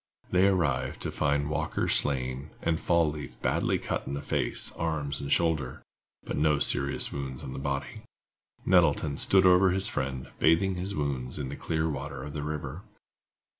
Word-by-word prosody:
They 90 +2 +5
arrived 85 -8 0
to - - -2
find 70 0 +1
Walker 75 - -1
slain, 65 +1 0
and 80 -1 +1
Fall 85 -3 +2
leaf 75 -3 -8
badly - - +1
cut - - -3
in 70 - -3
the 70 - -4
face, - - -1
arms 75 -3 -2
and 70 0 -5
shoulders, 80 -7 +1 0.4
but - - -4
no 75 -1 +3
serious 70 0 +1
wounds 65 -2 -5
on 65 - -6
the - - -5
body. 70 0 -3 0.6
Nettleton 80 -5 +3
stood 95 -1 +5
over 90 +1 +6
his 95 +2 +1
friend, 65 -1 -3
bathing 90 +4 +4
his 95 +3 -4
wounds 70 -4 -2
in 70 -3 -4
the 70 - -5
clear 80 +1 -1
waters 70 -2 -5
of 75 - -7
the 75 - -3
river. 75 +1 -4
75 Hz, 170 wpm, -28 LUFS, 70-85 Hz, 0.6 s, over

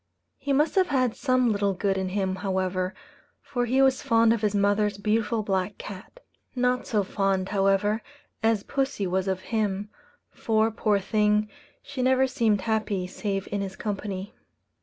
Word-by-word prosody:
He 285 - -3
must 295 +4 +3
have 375 -2 +3
had 255 -6 +1
some 255 -3 +2
little 200 -1 +1
good 195 +1 0
in 190 -1 -2
him 190 -1 -1
however, 185 -1 -1 0.4
for 245 -2 -2
he 260 +3 +3
was 265 -1 +3
fond 230 0 +4
of 230 - -2
his 210 -1 +1
mother's 205 0 +2
beautiful 215 +2 0
black 195 -1 -1
cat. 200 - -10 0.3
Not 250 0 +1
so 210 -3 +1
fond, 195 -1 0
however, 200 +2 +2 0.4
as 225 -2 +2
pussy 270 -7 -1
was 185 +1 -1
of 190 -1 -1
him; 210 -1 -1 0.4
for, 220 0 +1
poor 210 -1 +1
thing, 210 +1 +1 0.3
she 280 -2 -5
never 260 +1 +4
seemed 230 -6 +1
happy 210 -3 -1
save 195 +1 -3
in 200 0 -1
his 190 -1 -5
company. 200 -2 -4
210 Hz, 160 wpm, -26 LUFS, 195-230 Hz, 0.4 s, fond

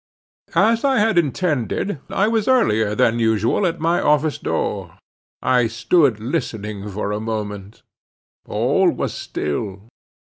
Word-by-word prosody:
As 225 +2 +3
I 270 -2 +3
had 215 -3 +3
intended, 155 - -1
I 200 - +1
was 220 -2 0
earlier 110 - +2
than 115 +2 +2
usual 115 - +2
at 170 0 -3
my 165 +2 +1
office 150 0 +2
door. - - -3 0.5
I 125 -2 +3
stood 120 +1 +2
listening 105 -5 -4
for 100 +1 -3
a 105 - -2
moment. 105 -2 -5 0.6
All - - +2
was - - -2
still. 95 +8 -4
120 Hz, 130 wpm, -20 LUFS, 105-175 Hz, 0.6 s, As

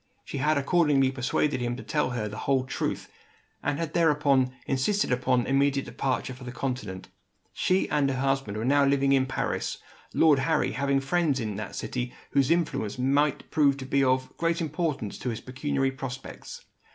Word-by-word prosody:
She 140 - -5
had 150 +2 +2
accordingly 140 -3 +3
persuaded 135 +1 0
him 120 0 -1
to 130 - -8
tell 150 -4 0
her 120 -4 -2
the 105 - -7
whole 135 -2 +1
truth, 130 - -3 0.5
and 145 0 -1
had 165 -1 -3
thereupon 145 -5 +3
insisted 135 +4 +1
on 125 -1 +4
an - - -4
immediate 140 0 +2
departure 130 -1 -2
for 130 +1 -12
the 125 - -6
Continent. 120 -8 -4 0.4
She 185 +1 +1
and 140 -2 +1
her 130 - -1
husband 135 -6 0
were 110 - -2
now 140 +2 +4
living 140 0 +3
in 130 -1 +3
Paris; 130 - -2 0.3
Lord 155 -4 +4
Harry 160 +2 +1
having 140 0 +1
friends 150 -1 +1
in 110 -4 -3
that 105 -1 -6
city 125 -1 -4 0.2
whose 140 -1 +3
influence 160 -11 0
might 140 +3 +1
prove 140 -3 +3
to 135 - -6
be 135 +1 +2
of 130 0 +1
great 165 0 0
importance 150 - -2
to 125 - -3
his 115 - -3
pecuniary 135 +1 -1
prospects. 130 -1 -8
135 Hz, 180 wpm, -27 LUFS, 130-145 Hz, 0.5 s, on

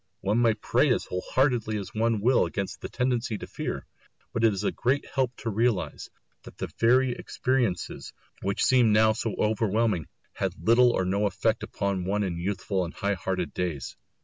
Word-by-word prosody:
One 105 +4 +1
may 115 -2 +4
pray 105 - +2
as - - +1
whole 90 - -3
heartedly 120 -5 +2
as 100 -3 -6
one 110 -1 +1
will 125 +4 +4
against 100 -2 -4
the - - -5
tendency 125 -3 -1
to - - -7
fear; - - -5 0.5
but 115 - -1
it 115 - +6
is 100 0 -3
a - - +1
great 135 +4 0
help 130 -3 -1
to 115 - -3
realise 115 -1 0 0.3
that - - -13
the - - -5
very 125 +3 +4
experiences 120 -6 -2 0.3
which 100 +1 -1
seem 125 -4 +5
now 110 +1 +5
so 110 -1 -3
overwhelming 110 -4 +1 0.3
had - - -2
little 120 +2 +6
or 95 -6 0
no 100 +3 +1
effect 110 +4 0
upon 100 -4 -2
one 105 +2 0
in 85 -3 -3
youthful 95 +1 -1
and 85 - -6
high 100 0 0
hearted 90 -3 -3
days. 85 -8 -3
110 Hz, 185 wpm, -27 LUFS, 95-120 Hz, 0.5 s, it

